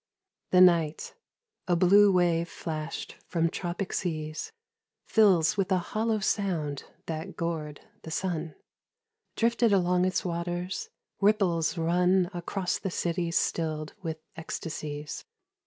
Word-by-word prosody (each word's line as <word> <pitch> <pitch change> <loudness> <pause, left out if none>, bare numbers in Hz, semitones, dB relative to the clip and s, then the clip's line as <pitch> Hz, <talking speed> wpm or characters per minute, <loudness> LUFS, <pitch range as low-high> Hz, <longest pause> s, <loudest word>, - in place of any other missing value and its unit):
THE 180 - +5
Night, 165 -4 +4 0.5
a 175 - +3
blue 200 +4 +6
wave 175 -2 +2
flashed 155 -1 -5
from 165 -1 +1
tropic 180 +2 -4
seas, 155 - -3 0.5
Fills 205 -3 +4
with 195 0 0
a 185 - +4 0.2
hollow 220 0 +1
sound 170 -8 -1 0.2
that 160 +4 -5
gourd 160 -3 -3 0.2
the - - -9
Sun 165 -2 -2 0.4
— 455 -1 -55
Drifted 235 0 +2
along 180 -2 +3
its 185 0 0
waters: 175 +1 -3 0.3
ripples 195 -5 +2
run 180 +2 +2
Across 180 +1 -2
the 195 - -3
cities 170 -1 -1
stilled 155 -2 -1
with 160 -3 -4 0.2
ecstasies. 150 -2 -5
175 Hz, 120 wpm, -28 LUFS, 160-190 Hz, 0.5 s, blue